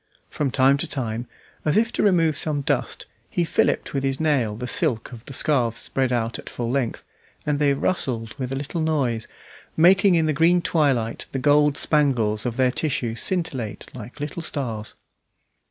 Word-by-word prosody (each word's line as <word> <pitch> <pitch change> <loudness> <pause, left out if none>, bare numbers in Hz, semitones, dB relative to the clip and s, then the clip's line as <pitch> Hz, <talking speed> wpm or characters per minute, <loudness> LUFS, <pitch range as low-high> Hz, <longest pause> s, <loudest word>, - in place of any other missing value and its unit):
From 145 -2 -1
time 135 +2 +4
to - - -2
time, 120 -3 -3 0.4
as 155 +5 +2
if 230 +1 +2
to - - -1
remove 165 -6 +3
some 150 -1 0
dust, - - -2 0.2
he 175 - 0
filliped - - 0
with 135 -1 -1
his 135 0 -1
nail 135 -9 +1
the 125 +3 -5
silk 125 -3 0
of 115 -2 -10
the - - -9
scarves 125 -4 +1
spread 130 -2 -1
out 120 -1 -1
at - - -9
full 120 -1 -3
length, 130 -3 -1 0.4
and 150 -1 0
they 140 -2 +3
rustled 120 -8 -2
with 130 -1 -3
a - - -1
little 145 +5 -3
noise, 135 -8 0 0.5
making 185 +3 +6
in 165 -1 +3
the 155 - +1
green 165 +4 +4
twilight 140 -10 0
the - - -1
gold 145 +2 +3
spangles 125 -8 +2
of 120 - -4
their 130 -1 +3
tissue 125 -6 -1
scintillate 125 - -3
like 120 +2 -10
little 145 +4 -4
stars. 120 -9 -4
135 Hz, 180 wpm, -23 LUFS, 120-155 Hz, 0.5 s, making